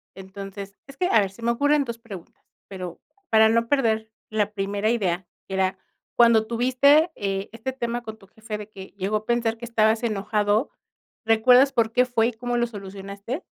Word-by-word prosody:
Entonces 195 +1 -9
es 275 - -12
que, 360 +6 0
a 225 - +5
ver, 200 -2 0
se 215 - -16
me 235 +1 +1
ocurren 285 +4 +2
2 235 -3 -6
preguntas, 200 -7 -11 0.3
pero 180 -3 -7 0.3
para 220 0 +6
no 230 +1 +2
perder 220 -5 +1 0.2
la 210 -1 -1
primera 200 +1 -1
idea, 185 -6 -1 0.2
que 190 - -5
era 190 0 0 0.4
cuando 230 -2 +5
tuviste, 265 +8 +4
eh, 195 0 -3
este 230 +4 -5
tema 240 -2 -3
con 220 -2 -8
tu 195 - -19
jefe 220 +1 -7
de 210 0 -9
que 190 -2 -10
llegó 200 +2 0
a 215 - -8
pensar 235 -1 0
que 235 - -7
estabas 220 0 +2
enojado, 210 +1 0 0.6
¿recuerdas 250 +5 +5
por 230 -3 +1
qué 250 +2 +3
fue 230 -2 +1
y 245 - -1
cómo 245 +2 -3
lo 240 - +2
solucionaste? 200 - -7
220 Hz, 190 wpm, -24 LUFS, 200-240 Hz, 0.6 s, para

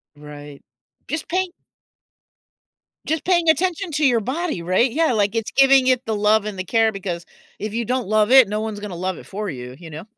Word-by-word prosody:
Right, 145 -1 -12 0.5
just 310 +4 -4
pay 370 +2 0 1.6
just 320 -1 -2
paying 345 -3 +2
attention 355 +3 0
to 300 0 0
your 245 -4 +3
body, 265 - -3
right, 185 +9 +1
yeah, 315 +2 +1
like, 205 0 0
it's 225 -2 -2
giving 270 -1 +5
it 255 -1 +3
the 220 - -2
love 210 +1 +2
and 210 -2 -5
the - - -2
care 225 +3 +2
because 180 -4 -5 0.3
if 215 0 -5
you 235 0 -2
don't 250 -3 -2
love 215 +2 +2
it, 260 -4 +8
no 210 +1 -2
one's 220 -2 -5
gonna 205 -4 -7
love 185 +1 -3
it - - -12
for 205 0 -5
you, 125 -2 -8
you 170 -2 -11
know? 155 +1 -8
220 Hz, 205 wpm, -21 LUFS, 190-270 Hz, 1.6 s, it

